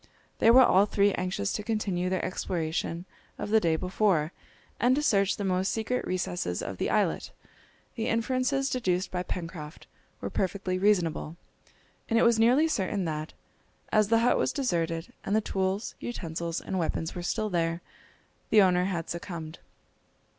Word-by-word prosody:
They 225 - +5
were 255 +3 +9
all 200 -2 +5
three 200 -1 +3
anxious 180 - -2
to - - -2
continue 205 -5 -1
their 185 -1 -1
exploration 170 -1 -2 0.3
of 210 - -5
the 220 - +6
day 165 -5 +2
before, 180 -2 +1 0.5
and 250 +2 +4
to 295 - 0
search 200 -7 +3
the 205 - -3
most 185 0 +1
secret 230 +3 -2
recesses 175 - -2
of - - -5
the - - -1
islet! - - +1 0.6
The 225 - -3
inferences 255 +4 0
deduced 190 -7 0
by 180 - -1
Pencroft 165 -4 -6 0.3
were - - -5
perfectly 185 -1 -1
reasonable, 175 -5 +1 0.7
and 230 - +2
it - - +5
was 230 -1 +4
nearly 250 +8 +5
certain 200 - -1
that, 155 -1 -4 0.6
as 215 -1 +4
the 230 +1 +3
hut 245 - +3
was - - +1
deserted, 170 - -2
and 200 - 0
the - - +5
tools, 195 0 -2
utensils, 170 -6 -4
and 190 - -3
weapons 160 -1 -2
were 175 - -5
still 215 +4 -1
there, 165 0 0 0.7
the 220 - +6
owner 180 -2 +4
had 175 -4 -2
succumbed. 170 -2 -6
190 Hz, 160 wpm, -28 LUFS, 170-220 Hz, 0.7 s, were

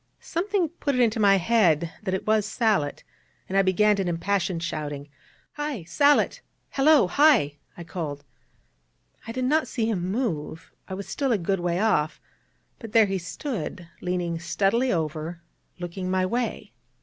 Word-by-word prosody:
Something 365 0 -1
put 290 -4 -2
it 250 - +2
into 225 -1 +2
my 200 -2 +6
head 175 -5 +2
that 190 -3 -1
it 190 - -4
was 215 -1 +3
Sallitt, 215 -8 0 0.4
and 190 - -4
I 195 - +6
began 200 +2 +3
an 185 - -2
impassioned 175 0 -1
shouting. 145 -3 -4 0.5
'Hi! 295 - -3
Sallitt! 285 - +3 0.3
Hallo! 290 -2 +5
Hi!' 200 - +4 0.2
I 170 - -7
called. 155 -4 -5 1.0
I - - -4
did 255 +2 -2
not 305 +4 +2
see 225 -4 -1
him 185 -5 -1
move: 165 - -3 0.2
I 190 - -5
was 200 0 -7
still 275 -3 -1
a 225 - +3
good 195 +1 -1
way 175 0 0
off: 155 -8 +1 0.6
but 225 -3 -9
there 225 -1 +7
he 195 -1 -2
stood, 185 - -5
leaning 175 -2 -2
steadily 200 +9 +1
over, 160 +1 -3 0.3
looking 180 +1 -5
my 185 0 +1
way. 230 - -3
195 Hz, 160 wpm, -25 LUFS, 170-235 Hz, 1.0 s, there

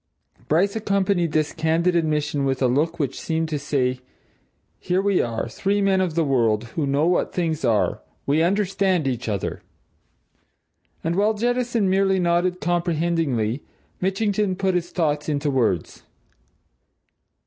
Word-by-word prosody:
Bryce 190 +7 +2
accompanied 200 -5 +1
this 155 -1 0
candid 165 +3 +1
admission 150 -3 0
with 135 -1 0
a - - +4
look 155 +7 0
which 145 -6 -2
seemed 160 -1 -1
to 150 -2 -2
say: 130 -3 0 0.8
Here 180 +1 0
we 200 -1 +2
are, 115 -1 -2
three 200 - -1
men 195 -1 +2
of 175 -4 -1
the 165 - +2
world, 115 -6 +2
who 145 +4 -2
know 140 +3 +2
what 175 +1 +1
things 165 -3 -1
are 115 -4 +1 0.2
we 145 +3 +2
understand 190 -3 +1
each 125 -3 -2
other! 100 -3 -3 1.4
And 165 +1 0
while 210 +3 +2
Jettison 240 -1 0
merely 190 0 +2
nodded 175 +1 +1
comprehendingly, 165 - 0 0.4
Mitchington 195 +1 0
put 190 0 0
his 175 -1 -1
thoughts 150 -3 -1
into 145 0 0
words. 115 - 0
165 Hz, 140 wpm, -23 LUFS, 145-190 Hz, 1.4 s, a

